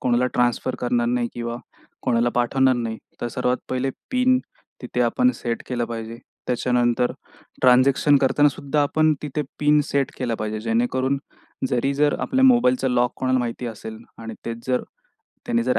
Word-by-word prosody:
कोणाला 125 Hz, 0 st, +2 dB
ट्रान्सफर 125 Hz, +1 st, +1 dB
करणार 120 Hz, -1 st, +1 dB
नाही 120 Hz, 0 st, 0 dB
किंवा 120 Hz, 0 st, -4 dB, 0.5 s
कोणाला 120 Hz, -2 st, +2 dB
पाठवणार 130 Hz, +2 st, +3 dB
नाही. 115 Hz, -2 st, -3 dB, 0.2 s
तर 120 Hz, -, -2 dB
सर्वात 125 Hz, 0 st, 0 dB
पहिले 130 Hz, +1 st, -1 dB, 0.2 s
पिन 255 Hz, 0 st, +3 dB, 0.4 s
तिथे 125 Hz, 0 st, -3 dB
आपण 185 Hz, -, +3 dB
सेट 115 Hz, -1 st, -4 dB
केलं 120 Hz, -2 st, -1 dB
पाहिजे. 115 Hz, 0 st, -6 dB, 0.3 s
त्याच्यानंतर 125 Hz, 0 st, +1 dB, 0.5 s
ट्रान्झॅक्शन 130 Hz, +3 st, +5 dB
करतानासुद्धा 145 Hz, +1 st, +2 dB
आपण 155 Hz, +2 st, +2 dB
तिथे 150 Hz, 0 st, -2 dB, 0.2 s
पिन 150 Hz, 0 st, +4 dB
सेट 140 Hz, -1 st, +1 dB
केला 120 Hz, -3 st, -1 dB
पाहिजे. 110 Hz, 0 st, -3 dB
जेणेकरून 125 Hz, +4 st, 0 dB, 0.5 s
जरी 135 Hz, +3 st, 0 dB
जर 145 Hz, +1 st, +2 dB
आपल्या 265 Hz, +1 st, +2 dB
मोबाईलचा 250 Hz, -, +4 dB
लॉक 125 Hz, 0 st, +1 dB
कोणाला 130 Hz, 0 st, +1 dB
माहिती 120 Hz, 0 st, -3 dB
असेल 110 Hz, -1 st, -7 dB, 0.2 s
आणि 115 Hz, -1 st, -7 dB
तेच 115 Hz, 0 st, -6 dB
जर 125 Hz, -1 st, +1 dB, 0.6 s
त्यांनी 235 Hz, -1 st, +1 dB
जर 255 Hz, -, +1 dB
125 Hz, 150 wpm, -23 LUFS, 120-140 Hz, 0.6 s, ट्रान्झॅक्शन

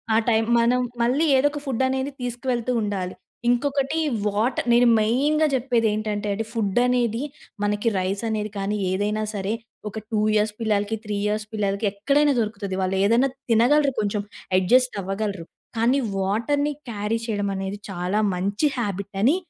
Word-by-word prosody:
ఆ -, -, +5 dB
టైమ్ 225 Hz, -1 st, +3 dB
మనం 245 Hz, +2 st, +3 dB, 0.2 s
మళ్ళీ 255 Hz, +7 st, +2 dB
ఏదో 270 Hz, +2 st, +4 dB
ఒక 295 Hz, -, -5 dB
ఫుడ్డనేది 265 Hz, +1 st, 0 dB
తీసుకువెళుతూ 245 Hz, 0 st, -2 dB
ఉండాలి. 195 Hz, -3 st, -3 dB, 0.3 s
ఇంకొకటి 275 Hz, +4 st, +1 dB, 0.3 s
వాటర్. 215 Hz, +5 st, 0 dB
నేను 240 Hz, +1 st, +5 dB
మెయిన్‌గా 285 Hz, +8 st, +2 dB
చెప్పేది 240 Hz, -3 st, +1 dB
ఏంటంటండి 210 Hz, 0 st, -2 dB
ఫుడ్డనేది 235 Hz, +2 st, +1 dB, 0.4 s
మనకి 210 Hz, +2 st, +1 dB
రైసనేది 210 Hz, +3 st, -2 dB
కానీ 200 Hz, +2 st, -1 dB
ఏదైనా 210 Hz, +3 st, 0 dB
సరే! 200 Hz, +1 st, -2 dB, 0.4 s
ఒక 220 Hz, -, -6 dB
2 215 Hz, -2 st, +1 dB
ఇయర్స్ 210 Hz, 0 st, +2 dB
పిల్లలకి, 210 Hz, -1 st, +1 dB
3 210 Hz, -1 st, -3 dB
ఇయర్స్ 215 Hz, +1 st, -1 dB
పిల్లలకి 200 Hz, 0 st, 0 dB
ఎక్కడైనా 280 Hz, +8 st, +2 dB
దొరుకుతది. 205 Hz, -4 st, -2 dB
వాళ్ళు 190 Hz, 0 st, 0 dB
ఏదైనా 235 Hz, +6 st, +3 dB, 0.2 s
తినగలరు 275 Hz, +5 st, +4 dB
కొంచెం. 205 Hz, 0 st, -1 dB, 0.4 s
అడ్జస్ట్ 250 Hz, +7 st, +3 dB
అవ్వగలరు. 195 Hz, -2 st, -3 dB, 0.3 s
కానీ 245 Hz, +5 st, +3 dB, 0.2 s
వాటర్‌ని 235 Hz, +10 st, 0 dB, 0.2 s
క్యారీ 210 Hz, +1 st, -1 dB
చేయడమనేది 200 Hz, -2 st, -2 dB
చాలా 185 Hz, +3 st, -1 dB
మంచి 200 Hz, +10 st, 0 dB
హాబిట్ 200 Hz, -3 st, -3 dB
అని 275 Hz, +8 st, +5 dB
220 Hz, 135 wpm, -24 LUFS, 205-250 Hz, 0.4 s, ఆ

